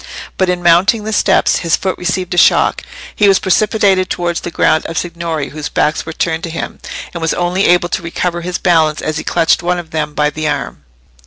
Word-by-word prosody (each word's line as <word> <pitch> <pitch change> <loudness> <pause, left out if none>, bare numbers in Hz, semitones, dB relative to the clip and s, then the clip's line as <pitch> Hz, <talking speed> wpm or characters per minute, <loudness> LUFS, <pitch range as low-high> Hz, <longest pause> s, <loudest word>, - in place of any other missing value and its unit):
But 185 -1 0
in 180 -1 -1
mounting 185 +6 +4
the 220 +1 -3
steps, - - +2
his 165 -2 +1
foot 190 -1 -2
received 180 0 -2
a - - -3
shock; - - +3 0.3
he 210 - +3
was 195 -1 +5
precipitated 195 -1 +2
towards 175 -1 -2
the - - -5
group 160 -1 +2
of 165 - -5
signori, 170 -4 -3
whose 150 0 -6
backs 155 +2 0
were - - -4
turned 160 0 -1
to - - -6
him, 165 - -6 0.3
and 170 - -6
was 160 - 0
only 180 +2 0
able 175 0 +3
to - - -2
recover 175 +1 -3
his 180 +1 -3
balance 160 -4 +1
as 155 0 -2
he - - -5
clutched 165 -1 +1
one 175 +1 0
of 170 -2 -8
them 150 -2 -3
by 150 0 +1
the 155 0 -3
arm. - - -4
175 Hz, 220 wpm, -15 LUFS, 160-180 Hz, 0.3 s, was